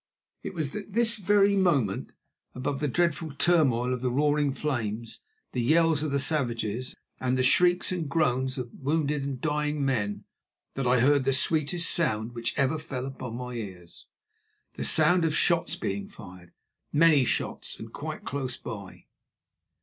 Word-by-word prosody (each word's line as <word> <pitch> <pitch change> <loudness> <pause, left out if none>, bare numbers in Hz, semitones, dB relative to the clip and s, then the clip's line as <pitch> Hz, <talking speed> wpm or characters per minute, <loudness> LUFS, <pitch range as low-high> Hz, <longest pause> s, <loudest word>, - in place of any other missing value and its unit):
It - - -7
was 155 -4 -3
at 210 -1 -7
this 230 0 +3
very 200 0 +3
moment, 145 - +1 0.4
above 135 +2 -3
the 150 - 0
dreadful 165 +1 0
turmoil 135 -6 +2
of 125 - -4
the 130 - 0
roaring 145 +2 +2
flames, 115 -6 -3 0.3
the 125 - -1
yells 160 +3 +3
of 155 - -1
the 140 - 0
savages 125 -5 0 0.2
and 130 0 0
the 130 - +2
shrieks 175 +8 +3
and 170 -5 -3
groans 130 -4 0
of 125 -2 -5
wounded 150 0 -1
and 135 -2 -4
dying 150 -1 -1
men, 105 -6 -1 0.5
that 135 -2 -2
I 125 -1 +4
heard 140 +1 +4
the 135 +1 +1
sweetest 155 +4 +1
sound 110 -9 0
which 115 -1 -2
ever 150 +2 +1
fell 130 -4 -5
upon 130 -3 -6
my 125 0 -6
ears—the 95 -7 -11
sound 175 -1 +4
of 160 -2 +1
shots 170 0 +2
being 200 +2 -4
fired, 90 - -13 0.4
many 150 -2 +5
shots, - - -2
and - - -10
quite - - -6
close 130 -3 -4
by. 100 -4 -9
140 Hz, 155 wpm, -27 LUFS, 125-160 Hz, 0.5 s, many